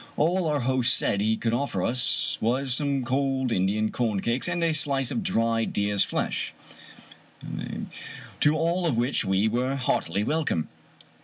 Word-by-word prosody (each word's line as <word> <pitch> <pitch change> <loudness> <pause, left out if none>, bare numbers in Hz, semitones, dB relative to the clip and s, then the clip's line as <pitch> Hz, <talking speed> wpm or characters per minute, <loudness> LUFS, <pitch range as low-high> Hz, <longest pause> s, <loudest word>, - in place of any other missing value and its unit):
All 170 +3 +1
our 150 -3 0
host 125 0 +2
said 100 - 0
he 110 +1 +1
could 115 -1 -1
offer 120 -7 -1
us 125 +1 +1
was 130 +3 +1
some 140 -2 0
cold 130 0 0
Indian 105 +3 0
corn 110 -5 -1
cakes 115 - +2
and 175 -1 -1
a 165 -1 +2
slice 140 -4 +2
of 230 - -2
dried 115 - 0
deer's 100 -1 +2
flesh, - - -3 1.8
to 150 +1 +4
all 170 +2 0
of 130 -8 0
which 120 +4 +2
we 95 +3 +1
were 125 +4 -1
heartily 100 -7 -1
welcome. 145 - -1
125 Hz, 155 wpm, -26 LUFS, 110-145 Hz, 1.8 s, to